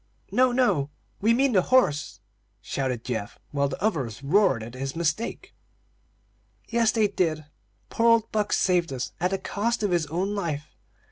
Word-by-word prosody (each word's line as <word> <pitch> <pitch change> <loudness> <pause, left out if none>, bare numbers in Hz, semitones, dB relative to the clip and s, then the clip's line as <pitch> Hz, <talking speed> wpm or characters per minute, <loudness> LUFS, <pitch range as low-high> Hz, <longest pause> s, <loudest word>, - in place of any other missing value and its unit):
"No, 255 0 +4
no, 205 - +2 0.3
we 220 +3 +4
mean 265 +3 +3
the 190 -5 +4
horse;" 150 - +1 0.4
shouted 130 -4 -3
Geoff, 110 -5 -4
while 140 -1 +1
the 135 - -5
others 135 - -1
roared 160 - +3
at 115 - -8
the 135 +1 -4
mistake. 170 +7 -2 1.1
"Yes, 230 -2 +2
they 220 -2 +2
did. 165 -6 -1 0.5
Poor 230 - +2
old 230 -1 +3
Buck 210 -1 0
saved 175 -3 +2
us, 130 -2 -4
at 180 +2 +1
the 195 - -1
cost 215 +4 -2
of 205 - +1
his 170 -3 +1
own 180 +6 -2
life. 160 -7 -4
180 Hz, 160 wpm, -26 LUFS, 140-215 Hz, 1.1 s, No